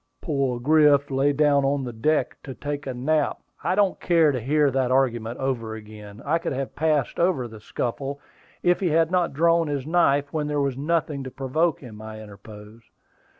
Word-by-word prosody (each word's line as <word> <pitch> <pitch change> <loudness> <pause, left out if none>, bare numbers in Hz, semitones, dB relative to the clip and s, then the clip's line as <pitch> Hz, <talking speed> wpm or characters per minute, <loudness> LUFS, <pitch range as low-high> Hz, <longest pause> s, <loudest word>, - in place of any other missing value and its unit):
"Poor 135 -6 -1
Griff 145 0 +4
lay 135 +2 +2
down 145 -1 +3
on 135 0 0
the 125 -2 -5
deck 135 +3 0
to 135 -3 -8
take 145 -1 -5
a 130 - -3
nap 150 +4 0 0.2
" - - -26
"I 185 - +1
don't 200 -2 +2
care 165 -4 +3
to 130 - -2
hear 145 +3 +2
that 130 -1 0
argument 120 -3 0
over 120 -5 -2
again. 105 0 -11
I 160 +4 +1
could - - -3
have 135 0 -4
passed 150 -3 0
over 170 -8 +1
the 110 -1 -11
scuffle, 135 +6 -4 0.4
if 175 0 +3
he 190 - 0
had 165 +1 +2
not 180 -4 +1
drawn 165 +2 +3
his 140 -3 -3
knife 145 -4 +2
when 150 -2 -1
there 150 -1 -1
was 140 -2 0
nothing 150 -1 -1
to - - -5
provoke 140 +5 -1
him," 110 -5 -11
I 110 0 -8
interposed. 105 +2 -13
140 Hz, 195 wpm, -24 LUFS, 125-155 Hz, 0.4 s, Griff